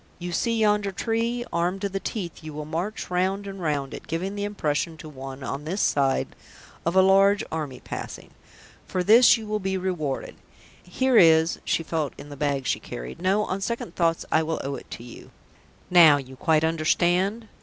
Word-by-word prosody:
You 175 0 -5
see 230 +7 0
yonder 210 -2 +2
tree? 230 +4 -1
Armed 175 +3 0
to 200 - -1
the 195 0 -3
teeth 180 -6 -5
you 155 -1 -7
will 150 0 -5
march 175 +7 -4
round 190 +3 0
and 195 -1 -7
round 145 -4 -2
it, - - -9
giving 180 +5 -3
the 205 0 -3
impression 160 -5 -2
to 155 - -10
one 135 -2 -8
on 140 +2 -4
this 175 +7 -3
side 135 -6 +1 0.6
of 170 - 0
a 190 - +7
large 195 +1 +5
army 150 -5 -4
passing. - - -7 0.6
For 185 - -1
this 235 +5 +7
you 225 - -8
will 215 0 -2
be 190 -1 -2
rewarded. 175 -7 -3 0.4
Here 255 +7 +1
is 160 0 +5
" - - -32
She 165 - 0
felt 155 -3 -2
in 145 - -10
the 145 - -8
bag 140 -1 -1
she - - 0
carried. - - -8
"No, 195 +3 +2
on 190 +2 -3
second 235 -4 -3
thoughts 165 -2 +1
I 160 - +4
will 160 0 -2
owe 140 - -3
it - - -9
to - - -8
you. 120 - -12 0.6
Now 165 -5 +8
you 130 -1 -8
quite 155 +3 +2
understand?" 175 +7 +1
175 Hz, 195 wpm, -25 LUFS, 150-200 Hz, 0.6 s, Now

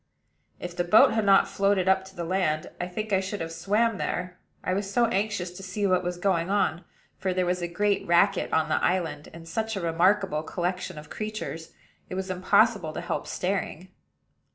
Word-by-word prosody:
If 175 -1 -6
the 175 - 0
boat 180 +5 +6
had 220 -2 +1
not 195 -1 +6
floated 195 -2 +1
up 190 0 +3
to 190 0 -14
the 175 - -4
land, 165 -3 -1
I 175 - -2
think 215 +3 -4
I 190 - +4
should 195 +2 -4
have 165 0 -4
swam 210 +5 +1
there, 180 0 -3 0.2
I 185 - 0
was 195 +1 -2
so 240 +2 +3
anxious 200 -4 -1
to 180 - -10
see 195 +2 -3
what 185 -2 +3
was 180 0 -3
going 175 -2 0
on; 185 -4 +1 0.4
for 185 -1 -1
there 185 -1 +1
was 180 0 -1
a 175 - -1
great 200 +4 0
racket 180 +3 +3
on 160 -1 +2
the - - 0
island, 170 -5 -1
and 165 0 -12
such 220 +6 -2
a - - -2
remarkable 170 0 +2
collection 180 +1 -3
of 150 0 -11
creatures, 215 -6 -5 0.4
it - - -5
was 190 0 -3
impossible 185 -2 +2
to - - -4
help - - -3
staring. 185 -1 -3
185 Hz, 200 wpm, -26 LUFS, 175-200 Hz, 0.4 s, boat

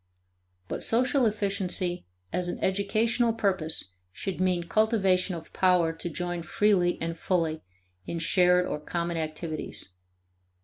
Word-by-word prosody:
But - - -4
social 250 +2 +3
efficiency 195 - -1 0.3
as 180 -1 0
an 175 - -3
educational 220 +5 +1
purpose 185 - 0 0.2
should 185 - -4
mean 180 -2 +1
cultivation 195 -2 +2
of 165 -1 -10
power 180 -3 +3
to 165 +1 -6
join 175 +1 -3
freely 180 0 +2
and 165 0 -3
fully 165 -2 -1 0.5
in 170 - -3
shared 180 +2 +3
or 150 - -3
common 170 +2 -3
activities. 155 - -4
180 Hz, 125 wpm, -28 LUFS, 170-200 Hz, 0.5 s, social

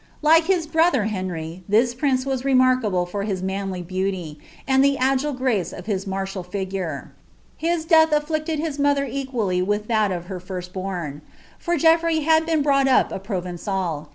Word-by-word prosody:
Like 320 +2 +5
Ikia 360 -3 +1
bruthw 320 -7 +2
Henry, 180 -3 -5
this 235 +4 +3
prinee 260 0 0
waa 270 -1 0
remarkable 255 -8 +2
fcir 200 +3 -4
hin 195 -3 -1
nianly 190 -2 -3
beauty, 185 -4 -3 0.3
ui] 265 -1 +2
the 275 0 +4
afile 270 +2 0
gnee 245 -8 -1
of 175 - -9
h)« 195 -2 -2
martial 195 0 -3
figuie. 185 -4 -4 0.5
Hi* 340 +2 +1
death 320 -1 +6
afllirted 310 +1 -1
hi« 300 -2 -3
mother 285 -1 +2
cqiwlly 245 -8 -2
w 180 - -1
iih 205 0 0
that 215 -3 +1
of 175 -1 -4
hrr 185 -1 -6
firvl 180 -1 -7
born; 175 -6 -5 0.4
for 345 0 -1
GcnlTrey 325 0 +3
had 320 +1 +3
been 320 -3 +1
brought 275 -1 +3
up 260 - +3
a - - -3
I'rovenfil. 180 -4 -3
215 Hz, 175 wpm, -22 LUFS, 185-285 Hz, 0.5 s, death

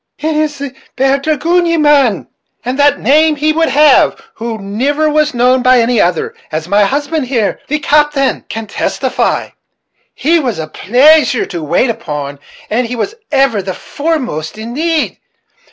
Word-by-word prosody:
"It 310 +1 -2
is 305 -1 -1
the 275 -2 -6 0.2
bould 270 +1 +1
dragoon, 325 +4 +1
ye 335 0 +1
mane? 285 - +3 0.4
And 255 +3 -3
what 285 0 +3
name 310 +3 +3
would 310 +1 +1
he 265 - -3
have, 295 -2 +4
who 230 0 -5
niver 260 +10 -1
was 305 -2 +1
known 250 +2 +3
by 255 0 +4
any 235 0 +2
other, 175 -1 0 0.2
as 160 +1 -3
my 200 +2 +3
husband 290 +3 -2
here, 235 -5 -1
the 300 - 0
captain, 295 -2 +1
can 225 0 -5
testify? 205 - -2 0.7
He 330 +4 +2
was 250 -7 -2
a 160 - -4
pleasure 255 - +3
to 170 -3 -6
wait 175 - +1
upon, 145 -8 -6 0.3
and 235 +2 -1
was 315 - -3 0.2
ever 270 -7 +2
the 185 -1 -5
foremost 255 - -3
in 225 +2 -7
need. 320 +2 -1
270 Hz, 160 wpm, -13 LUFS, 220-300 Hz, 0.7 s, have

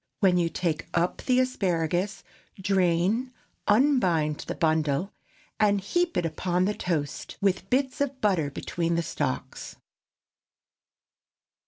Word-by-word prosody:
When 185 -4 +4
you 170 -1 +2
take 165 -2 -2
up 175 +1 +1
the 255 -1 +2
asparagus, 185 -5 0 0.4
drain, 190 +5 +1 0.4
unbind 195 - +3
the - - -3
bundle, 160 +2 +1 0.5
and 205 -1 +4
heap 345 - 0
it 175 - +1
upon 175 +3 0
the 210 - +1
toast, 155 -8 -3
with 195 -1 0
bits 265 +1 0
of 275 -2 -1
butter 185 - +1
between 170 +4 -2
the 170 - 0
stalks. 130 -4 -4
180 Hz, 120 wpm, -27 LUFS, 165-210 Hz, 0.5 s, When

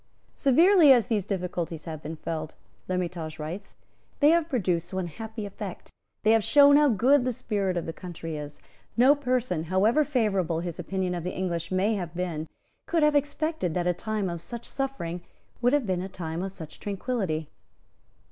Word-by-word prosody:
"Severely 325 +3 +6
as 245 -4 +6
these 215 -6 0
difficulties 175 -4 -3
have 160 -3 -6
been 155 +2 -6
felt," 155 0 -5 0.3
L'Hermitage 175 -3 -3
writes, 165 +6 -7 0.4
"they 295 +1 +6
have 335 -1 +2
produced 180 - -1
one 190 -1 -1
happy 220 +5 -6
effect; 200 -2 -7 0.3
they 215 - +5
have 225 -1 +4
shown 285 +3 +7
how 295 0 +6
good 250 +4 +4
the 255 - 0
spirit 200 -5 -1
of 170 - -2
the 165 - -4
country 165 -3 -7
is. 150 -1 -7 0.4
No 255 +4 +7
person, 250 - -1
however 205 - +3
favourable 195 - 0
his 175 -2 -5
opinion 190 -2 -2
of 175 -2 -4
the 180 - -4
English 170 -3 -2
may 190 +4 +2
have 175 -5 -4
been, 170 -3 -3 0.4
could 330 -2 +2
have 300 0 +4
expected 290 - 0
that 175 -1 0
a 180 - +2
time 215 +2 -2
of 170 -2 -4
such 235 +4 -8
suffering 220 -11 -3 0.4
would 245 0 +4
have 290 -3 +2
been 185 -3 -1
a 190 - -5
time 165 -2 -5
of 190 0 -3
such 160 -5 -10
tranquillity." 195 - -2
190 Hz, 180 wpm, -27 LUFS, 170-250 Hz, 0.4 s, shown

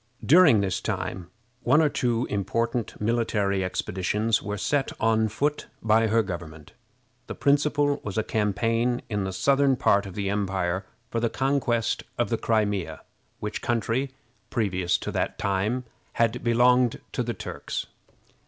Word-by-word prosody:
During 155 - +6
this 95 -2 -1
time 90 -2 -4 0.3
one 145 - +4
or 160 - +4
two 125 -4 0
important 115 +3 -2
military 105 -3 0
expeditions 100 +4 0
were 105 +1 -4
set 140 +6 0
on 110 0 +2
foot 145 +7 -1 0.2
by 110 +1 +4
her 115 +1 +3
government. 85 -5 -7 0.6
The - - -5
principal 145 0 +2
was 105 -1 -5
a 110 - +2
campaign 115 +4 0
in 105 -3 -1
the 95 - -3
southern 135 +8 +3
part 100 -5 +2
of 95 - -10
the 100 -1 -2
empire 95 -2 -1 0.2
for 115 - 0
the 115 0 +1
conquest 135 -4 0 0.2
of - - 0
the - - 0
Crimea, 105 -8 0 0.4
which 105 0 -4
country, 120 +3 0 0.4
previous 95 -6 0
to - - -5
that - - -2
time, 100 +6 0 0.3
had 115 +1 +1
belonged 120 +1 +3
to - - -2
the 120 -1 -2
Turks. - - -5
110 Hz, 145 wpm, -26 LUFS, 100-125 Hz, 0.6 s, During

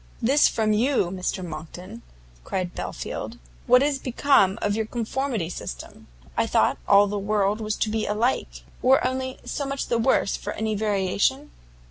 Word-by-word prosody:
"This 275 +6 +4
from 215 -1 +1
you, 225 -5 +1
Mr 185 0 -3
Monckton!" 175 +7 -8 0.4
cried 180 - -3
Belfield, - - -5 0.3
"what 250 +2 +6
is 285 -1 0
become 245 -7 +3
of 205 0 0
your 220 0 -1
conformity 235 -4 -2
system? 65 - -8 0.3
I - - +1
thought - - +2
all 200 +1 +7
the 205 0 -3
world 205 +1 0
was 215 -1 -2
to 215 - -1
be 220 0 -1
alike, 225 +5 -1 0.2
or 260 +1 +4
only 260 0 -2
so 285 - -3
much 275 0 -3
the 235 - +1
worse 230 -4 +2
for - - -5
any 220 0 -2
variation?" 210 +7 0
215 Hz, 160 wpm, -24 LUFS, 195-255 Hz, 0.4 s, all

